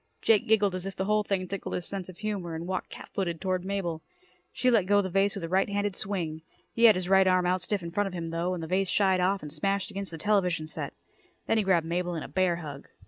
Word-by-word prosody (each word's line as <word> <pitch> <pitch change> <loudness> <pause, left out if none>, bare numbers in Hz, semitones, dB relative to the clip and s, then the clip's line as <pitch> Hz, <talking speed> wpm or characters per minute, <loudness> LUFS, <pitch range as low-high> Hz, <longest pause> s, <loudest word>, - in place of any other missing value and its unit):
Jake 215 -3 +4
giggled 210 -3 +3
as 185 +1 -4
if 195 - -6
the 190 - -2
whole 210 +1 +3
thing 190 -2 -1
tickled 195 +1 -4
his 180 - -3
sense 190 -2 -4
of 180 - -10
humor, 195 -6 -3
and 165 +1 -5
walked 185 +1 -3
cat - - -10
footed 170 -4 -2
toward 185 0 -1
Mabel. 185 -4 -2 0.5
She 255 - +2
let 210 -6 +3
go 205 +1 +5
the 190 -2 -1
vase 195 +2 +2
with 195 - -5
a - - -2
right 190 +4 +2
handed 205 -1 -1
swing. 170 -6 -2 0.3
He 235 - +4
had 220 -3 +8
his 180 -1 -2
right 190 0 +5
arm 185 -1 +3
out 180 +1 +1
stiff 195 +1 -1
in 170 - -5
front 205 +3 0
of 195 - -6
him, 165 -2 -4
though, 170 +2 -1
and 170 - -5
the - - -5
vase 190 +2 +1
shied 190 -2 +3
off 190 +1 +1
and 150 -1 -7
smashed 195 +5 -1
against 195 0 -5
the 165 - -7
television 180 -4 +1
set. 155 - -6 0.5
Then 225 - +2
he - - +2
grabbed 180 -4 +2
Mabel 175 +1 -1
in 160 - -4
a - - -7
bear 185 -2 +1
hug. 145 -5 -8
185 Hz, 270 wpm, -28 LUFS, 175-200 Hz, 0.5 s, had